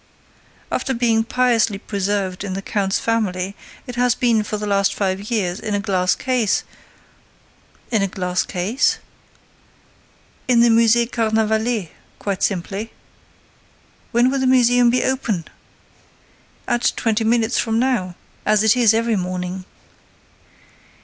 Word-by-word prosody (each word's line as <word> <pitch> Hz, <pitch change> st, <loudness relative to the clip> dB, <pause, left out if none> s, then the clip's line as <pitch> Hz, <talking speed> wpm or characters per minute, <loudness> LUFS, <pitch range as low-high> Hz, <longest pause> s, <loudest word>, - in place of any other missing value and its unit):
After 265 Hz, -, -1 dB
being 230 Hz, -2 st, +2 dB
piously 235 Hz, -3 st, +1 dB
preserved 200 Hz, -2 st, -2 dB
in 195 Hz, -2 st, -4 dB
the 195 Hz, +1 st, -5 dB
count's 195 Hz, -2 st, 0 dB
family, 200 Hz, -4 st, -1 dB, 0.3 s
it 250 Hz, -2 st, -8 dB
has 245 Hz, -1 st, +2 dB
been, 235 Hz, -3 st, +2 dB
for 210 Hz, 0 st, -4 dB
the 210 Hz, -, -4 dB
last 200 Hz, -1 st, +1 dB
five 195 Hz, +1 st, -2 dB
years, 195 Hz, -5 st, -1 dB
in 210 Hz, -1 st, -3 dB
a -, -, 0 dB
glass 185 Hz, -2 st, +1 dB
case—" 250 Hz, -6 st, 0 dB, 1.3 s
"A 205 Hz, -4 st, +2 dB
glass 180 Hz, -2 st, -2 dB
case?" 200 Hz, +10 st, 0 dB, 1.5 s
"In 245 Hz, -2 st, +4 dB
the 235 Hz, -, +5 dB
Musée 230 Hz, +1 st, +4 dB
Carnavalet, 220 Hz, -2 st, 0 dB, 0.3 s
quite 200 Hz, -2 st, -3 dB
simply." 200 Hz, +3 st, -2 dB, 1.2 s
"When 240 Hz, +2 st, +3 dB
will 275 Hz, -, 0 dB
the 260 Hz, -, +1 dB
museum 245 Hz, -1 st, +4 dB
be 250 Hz, +2 st, +1 dB
open?" 225 Hz, -10 st, -1 dB, 1.2 s
"At 240 Hz, -1 st, +1 dB
twenty 225 Hz, -1 st, 0 dB
minutes 230 Hz, +1 st, +1 dB
from 225 Hz, -1 st, 0 dB
now, 230 Hz, -8 st, 0 dB, 0.3 s
as 210 Hz, 0 st, +3 dB
it 220 Hz, +1 st, +4 dB
is 230 Hz, -3 st, +4 dB
every 230 Hz, 0 st, +1 dB
morning." 185 Hz, 0 st, -4 dB
220 Hz, 130 wpm, -20 LUFS, 195-235 Hz, 1.5 s, the